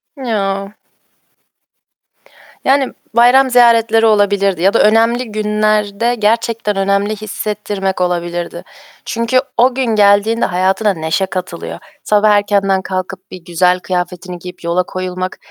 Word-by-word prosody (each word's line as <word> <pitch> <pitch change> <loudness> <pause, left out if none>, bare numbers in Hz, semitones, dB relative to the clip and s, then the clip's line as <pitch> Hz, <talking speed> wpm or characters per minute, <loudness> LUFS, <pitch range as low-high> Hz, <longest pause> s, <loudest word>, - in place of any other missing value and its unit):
Ya! 200 -6 -3 1.9
Yani, 270 0 +2 0.2
bayram 255 +3 +5
ziyaretleri 230 -2 +4
olabilirdi 200 -4 +2
ya 195 +2 +3
da - - +3
önemli 230 +2 +2
günlerde 215 +1 0
gerçekten 225 -1 0
önemli 200 +2 0
hissettirmek 205 -2 -4
olabilirdi. 175 -1 -3 0.4
Çünkü 230 +2 0 0.2
o 250 +1 +3
gün 265 -1 0
geldiğinde 215 +1 +3
hayatına 190 +3 +1
neşe 160 +3 -1
katılıyor. 180 -2 -6 0.2
Sabah 210 0 +3
erkenden 200 -2 +2
kalkıp 185 0 -6
bir 185 - -9
güzel 180 +1 +1
kıyafetini 180 0 -4
giyip 180 0 -11
yola 170 +2 0
koyulmak... 185 0 -5
205 Hz, 110 wpm, -15 LUFS, 185-225 Hz, 1.9 s, bayram